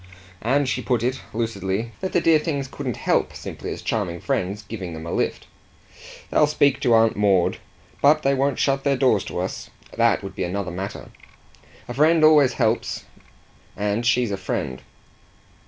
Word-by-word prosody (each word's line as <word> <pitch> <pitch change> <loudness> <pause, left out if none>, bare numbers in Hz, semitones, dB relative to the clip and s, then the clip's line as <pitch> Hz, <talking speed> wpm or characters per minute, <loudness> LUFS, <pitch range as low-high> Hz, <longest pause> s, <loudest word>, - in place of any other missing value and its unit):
And 135 +4 +1
she 125 0 -1
put 120 -3 0
it, 130 +2 -1
lucidly, 110 -1 -2
that 190 - -3
the 175 - +2
dear 165 -2 +5
things 145 -4 -2
couldn't 130 -3 -5
HELP, - - 0
simply - - -7
as - - -7
charming 90 -6 -2
friends, 105 -5 -2
giving 100 -5 -6
them 80 0 -8
a 85 - -5
lift. - - -1 0.9
"They'll 150 - +4
speak 145 -2 +2
to 120 - +3
Aunt 115 0 +4
Maud. 100 -4 +2 0.4
but 155 +2 +5
they 135 - +3
won't 135 0 +1
shut 135 -1 +1
their 140 -2 +2
doors 125 -7 +3
to - - -6
us: - - -4 0.3
that - - +2
would - - -7
be - - -2
another 90 +1 -3
matter. 95 +3 -6 0.8
A 120 - -5
friend 155 +4 +4
always 150 -4 +6
helps 115 -2 0 0.7
and 105 +3 -1
she's 120 -2 +2
a 100 - -2
friend." 65 -8 -3
120 Hz, 170 wpm, -23 LUFS, 100-140 Hz, 0.9 s, always